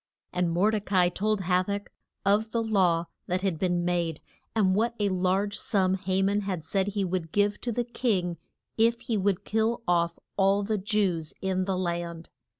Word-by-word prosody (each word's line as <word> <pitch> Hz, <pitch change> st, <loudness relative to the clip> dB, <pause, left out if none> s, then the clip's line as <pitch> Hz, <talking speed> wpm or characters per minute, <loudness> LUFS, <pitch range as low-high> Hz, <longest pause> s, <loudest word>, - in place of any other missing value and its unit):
And 180 Hz, -1 st, +1 dB
Mor 180 Hz, +6 st, +3 dB
de 215 Hz, -1 st, 0 dB
ca 200 Hz, -1 st, -4 dB
i 175 Hz, -, +4 dB
told 210 Hz, +3 st, 0 dB
Ha 180 Hz, 0 st, +2 dB
tach 200 Hz, +2 st, -4 dB, 0.3 s
of 210 Hz, +3 st, +3 dB
the 230 Hz, 0 st, 0 dB
law 185 Hz, -6 st, +2 dB, 0.2 s
that 180 Hz, +1 st, 0 dB
had 185 Hz, -5 st, 0 dB
been 175 Hz, -1 st, +1 dB
made, 170 Hz, -3 st, 0 dB, 0.4 s
and 195 Hz, -4 st, +3 dB
what 230 Hz, +4 st, +1 dB
a 205 Hz, -1 st, +2 dB
large 190 Hz, +2 st, 0 dB
sum 190 Hz, -3 st, +1 dB
Ha 190 Hz, 0 st, 0 dB
man 200 Hz, +1 st, +2 dB
had 190 Hz, -5 st, -3 dB
said 190 Hz, +4 st, 0 dB
he 200 Hz, -1 st, -1 dB
would 175 Hz, -3 st, -3 dB
give 205 Hz, 0 st, +1 dB
to 240 Hz, -, -2 dB
the 240 Hz, +2 st, 0 dB
king 205 Hz, -8 st, -1 dB, 0.4 s
if 230 Hz, +1 st, +3 dB
he 230 Hz, -, -2 dB
would 195 Hz, -2 st, 0 dB
kill 225 Hz, +2 st, 0 dB
off 170 Hz, -1 st, +2 dB, 0.2 s
all 195 Hz, +1 st, +3 dB
the 215 Hz, 0 st, -1 dB
Jews 190 Hz, -6 st, 0 dB
in 185 Hz, -1 st, 0 dB
the 190 Hz, -1 st, -1 dB
land. 170 Hz, -2 st, -3 dB
190 Hz, 195 wpm, -27 LUFS, 180-210 Hz, 0.4 s, i